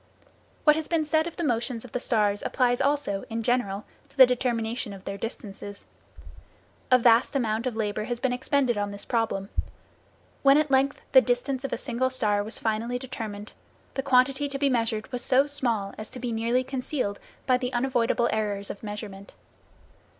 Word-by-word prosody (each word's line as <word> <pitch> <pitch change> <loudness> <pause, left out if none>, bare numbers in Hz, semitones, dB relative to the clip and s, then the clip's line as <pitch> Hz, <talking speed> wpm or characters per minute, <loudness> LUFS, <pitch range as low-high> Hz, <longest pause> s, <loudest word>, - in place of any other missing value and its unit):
What 300 -1 +6
has 315 -1 -2
been 325 -2 +1
said 315 +2 +2
of 335 - -7
the 345 - -3
motions 240 -3 -1
of 245 - -12
the 250 - -2
stars 210 -4 +1
applies 245 0 +1
also, 275 -8 0
in 225 0 -3
general, 215 -5 0 0.2
to - - -25
the 260 - +11
determination 240 -3 -1
of 195 -1 -12
their 195 - -4
distances. 205 -2 -7 1.0
A 255 - +7
vast 235 +3 +4
amount 230 -2 0
of 245 - -3
labor 215 -1 -2
has 240 0 -3
been 260 -1 0
expended 255 -3 +1
on 205 0 -1
this 200 0 -6
problem. 220 -4 -1 0.9
When 275 0 +6
at 305 -2 +1
length 270 +1 +2
the 260 - +8
distance 255 +2 -1
of 275 - -3
a - - -1
single 260 0 -1
star 210 -6 +1
was 215 - -3
finally 225 +2 -1
determined, 220 -5 -7 0.4
the 270 - -1
quantity 265 +2 +3
to 275 - -4
be 280 0 +2
measured 225 -1 -1
was 250 -1 -3
so 265 +2 +4
small 235 -9 -1
as 215 - -7
to 255 - -9
be 245 -1 -3
nearly 230 +3 +1
concealed 255 -5 -3 0.3
by 255 -1 +3
the 250 -1 -2
unavoidable 240 -1 +1
errors 205 -2 -1
of 200 - -10
measurement. 205 -2 -7
245 Hz, 185 wpm, -26 LUFS, 215-260 Hz, 1.0 s, the